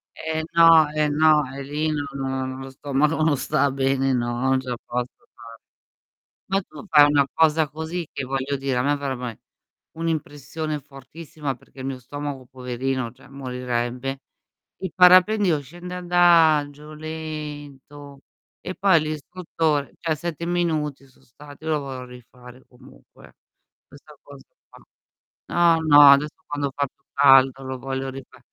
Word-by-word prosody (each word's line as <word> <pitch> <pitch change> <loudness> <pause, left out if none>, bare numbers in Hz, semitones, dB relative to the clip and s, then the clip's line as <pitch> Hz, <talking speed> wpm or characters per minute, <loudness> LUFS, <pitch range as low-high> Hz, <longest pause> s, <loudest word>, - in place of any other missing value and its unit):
Eh 160 0 -3
no, 165 -2 +7
eh 150 -1 +1
no, 155 0 +4
e 140 - -6
lì 150 +3 -2
no, 145 -1 -2
no 130 -1 -3
lo 135 0 -8
stomaco 145 +4 -1
non 150 -3 +2
sta 145 +1 +1
bene, 135 0 0
no, 120 -1 -1
non 130 0 +2
ce 130 -1 -8
la 120 - -3
posso 125 +1 -3 0.2
fare. 115 - -14 1.0
Ma 195 +1 0
tu 205 - -13
fai 150 -2 +7
una 140 -2 +3
cosa 160 -1 +3
così, 160 +2 -5
che 135 - -4
voglio 135 +1 -2
dire, 135 -2 -2
a - - +1
me 145 +1 +1
farebbe 135 -3 -4
ae 115 - -7 0.6
un'impressione 155 -1 -4
fortissima 140 +1 -8
perché 130 - -17
il 130 - -5
mio 135 -1 -4
stomaco, 140 0 -7
poverino, 130 -1 -4
cioè 130 - -19
morirebbe. 125 0 -4 0.6
Il 185 - -4
parapendio 185 -2 +5
scende 175 +6 -10
adagio, 160 -4 +3
lento, 145 -3 -8 0.4
e 185 - -6
poi 190 -4 +4
l'istruttore 155 -1 -2
cioè 165 -2 -1
7 170 +1 -5
minuti 155 -6 -2
so' 130 - -26
stati, 145 +5 -15
io 160 - -2
lo 155 - +1
vorrò 130 -2 -7
rifare 125 0 -15
comunque, 130 +2 -19 0.5
questa - - -17
cosa - - -14 0.2
qua. - - -18 0.6
No, 170 -1 +3
no, 145 -1 +7
adesso 145 +2 +2
quando 145 -2 -3
fa 140 0 0
più 140 - -24
caldo 135 -1 +5
lo 130 0 -6
voglio 135 +1 -4
rifa 135 0 -12
145 Hz, 150 wpm, -23 LUFS, 130-155 Hz, 1.0 s, no